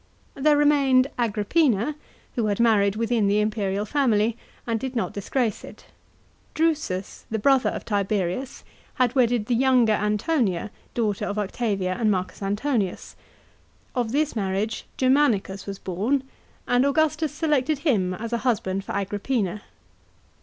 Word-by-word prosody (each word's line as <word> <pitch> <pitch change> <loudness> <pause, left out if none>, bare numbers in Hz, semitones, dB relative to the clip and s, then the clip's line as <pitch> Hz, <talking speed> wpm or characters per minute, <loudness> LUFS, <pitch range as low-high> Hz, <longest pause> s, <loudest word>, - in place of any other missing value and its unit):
There 295 +2 +3
remained 275 -3 +4
Agrippina, 235 +3 +1 0.4
who 230 -4 0
had 205 0 -1
married 210 -4 +3
within 230 -1 +1
the 205 +1 +3
imperial 210 -1 -1
family, 230 -4 +2 0.3
and 230 -1 -1
did 265 +2 -5
not 230 - -1
disgrace 220 +3 -2
it. - - -12 0.7
Drusus, 305 - -1
the 220 - -1
brother 265 +4 +3
of - - -6
Tiberius, 200 +3 -2 0.3
had 250 -2 +2
wedded 245 -4 +2
the 245 - 0
younger 245 -2 +4
Antonia, 210 - 0 0.2
daughter 215 -4 0
of 205 - -3
Octavia 200 -3 -1
and 220 -2 +3
M. 185 0 -1 0.2
Antonius. 205 0 -2 0.8
Of 240 -4 -1
this 300 +1 0
marriage 200 +1 -2
Germanicus 250 -8 +2
was 200 -1 -5
born, 215 +11 -1 0.4
and 245 +1 +3
Augustus 310 +2 +1
selected 300 -2 +1
him 190 - +2
as 230 +3 -6
a 235 - +1
husband 195 -6 -1
for - - -6
Agrippina. 205 0 -2
225 Hz, 135 wpm, -24 LUFS, 200-265 Hz, 0.8 s, remained